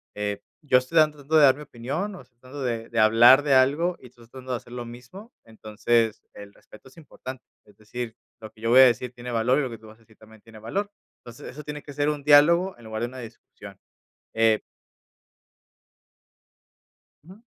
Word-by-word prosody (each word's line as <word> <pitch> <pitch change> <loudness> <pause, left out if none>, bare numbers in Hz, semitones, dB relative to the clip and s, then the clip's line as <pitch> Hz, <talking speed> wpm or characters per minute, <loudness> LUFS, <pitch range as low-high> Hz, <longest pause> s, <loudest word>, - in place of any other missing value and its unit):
eh, 105 -1 -4 0.2
yo 135 -4 +3
estoy 130 +6 -5
tratando 150 -1 +2
de - - +6
dar 130 -2 +6
mi 150 - -10
opinión 150 - -5
o - - -11
estoy 125 -1 -25
tratando 130 +2 -9
de 115 -2 -4
de 115 - -2
hablar 120 +6 +6
de 140 -3 +2
algo 150 +7 +2
y 125 - -14
estoy 120 -1 -20
tratando 130 +1 -10
de - - -1
hacer 120 +1 -15
lo 120 -1 -6
mismo. 125 - -13
Entonces, 110 +1 -1
el 100 0 -12
respeto 110 +5 -18
es 135 - -24
importante. 130 -4 -10 0.2
Es 105 - -22
decir, 115 +1 -7 0.3
lo 110 -1 -10
que 110 - -22
yo 115 - -2
voy 130 +2 +8
a - - +9
decir 125 0 0
tiene 120 0 -8
valor 120 +4 +1
y - - +1
lo 130 - -4
que 115 - -9
tú 110 - -16
vas 110 - -15
a 115 - -28
decir 110 -1 -24
también 110 0 -18
tiene 110 0 -15
valor. 200 - -4 0.3
Entonces, 120 -1 -12
eso 150 +4 -10
tiene 150 -1 -7
que 145 - -11
ser 145 +1 0
un 145 -2 -4
diálogo 170 +6 +4
en 120 - -17
lugar 110 0 -6
de - - -1
una 130 - -11
discusión, 105 -4 -13 0.6
eh 110 -1 +3 2.6
Ujú. 190 +6 -16
125 Hz, 210 wpm, -24 LUFS, 115-145 Hz, 2.6 s, a